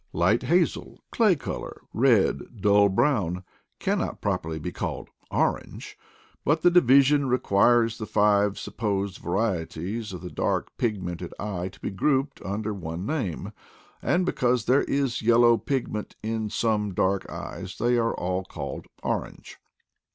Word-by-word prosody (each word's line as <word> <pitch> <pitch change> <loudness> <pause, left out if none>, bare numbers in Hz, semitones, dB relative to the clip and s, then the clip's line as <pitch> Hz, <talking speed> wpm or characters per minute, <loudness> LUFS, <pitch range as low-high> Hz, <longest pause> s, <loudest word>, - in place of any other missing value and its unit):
Light 95 +8 +3
hazel, 170 +6 0
clay 215 -6 +4
color, 140 - -6
red, 115 -1 +2
dull 100 0 +5
brown, 95 - +1 0.3
cannot - - -1
prop - - 0
erly 80 0 -5
be - - -4
called - - -5 0.2
orange; - - -2 0.5
but 155 +3 +1
the 175 - +6
division 140 -3 +5
requires 115 -1 +3
the 110 - -5
five 105 -1 +3
supposed 100 -3 -3
varieties 95 +2 -2
of 90 - -7
the 90 - -7
dark - - -1
pigmented 90 -6 -3
eye 95 -4 -3
to 95 - -12
be - - -4
grouped 135 +7 0
under 105 +2 -3
one 85 -1 -5
name, 125 - -3 0.5
and 180 +1 +1
because 125 -7 +1
there 130 +3 +4
is 135 -3 0
yellow 120 +1 +5
pigment 120 -4 -3
in 110 -1 -2
some 105 -3 0
dark 95 +1 0
eyes 90 +2 -7
they 120 +1 +2
are 115 -1 +1
all 90 +1 -2
called - - -7 0.2
orange. - - -4
110 Hz, 140 wpm, -26 LUFS, 95-125 Hz, 0.5 s, the